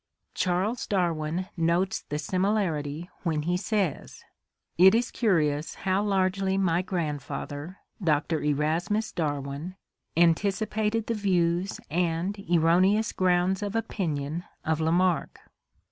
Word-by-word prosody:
Charles 185 +6 0
Darwin 175 -2 -1
notes 170 +3 +1
the 150 - -5
similarity 175 -3 -1
when 155 -4 -1
he 175 +3 0
says: 195 -4 -2 0.6
"It 190 +3 +8
is 240 +1 +1
curious 155 -9 +1
how 190 +1 0
largely 195 -1 +1
my 175 -3 +2
grandfather, 155 -1 -4 0.3
Dr. 155 0 +1
Erasmus 160 +9 0
Darwin, 145 +2 -3 0.4
antic 170 +4 +4
ipated 220 +1 -1
the 230 - -1
views 180 -3 0
and 175 +3 0 0.2
erroneous 185 +6 +4
grounds 185 +1 +2
of 205 +1 -3
opinion 165 -8 -2 0.2
of 160 0 0
Lamarck." 175 +2 +1
180 Hz, 110 wpm, -27 LUFS, 160-195 Hz, 0.6 s, It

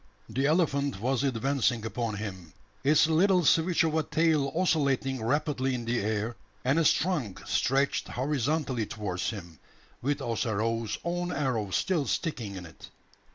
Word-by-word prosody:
The 135 +2 0
elephant 145 - +1
was 130 +4 0
advancing 125 -3 +1
upon 115 -1 -2
him, 95 -6 -7 0.3
its 150 +3 +5
little 180 +2 +3
switch 170 +2 +4
of 160 -2 +1
a 160 - +2
tail 155 -3 +1
oscillating 140 -7 +1
rapidly 135 0 0
in 120 -1 -4
the 115 +1 0
air, 110 +2 -1 0.3
and 135 +5 +3
its 160 - +5
trunk 155 - -1
stretched 135 +2 +1
horizontally 135 -2 -1
towards 100 -7 -3
him, 85 -8 -8 0.4
with 145 +3 0
Ossaroo's 115 -1 -1
own 175 +1 -2
arrow 130 - -1
still 155 - 0
sticking 115 - -2
in 90 -2 -7
it. 80 - -13
135 Hz, 145 wpm, -28 LUFS, 110-155 Hz, 0.4 s, its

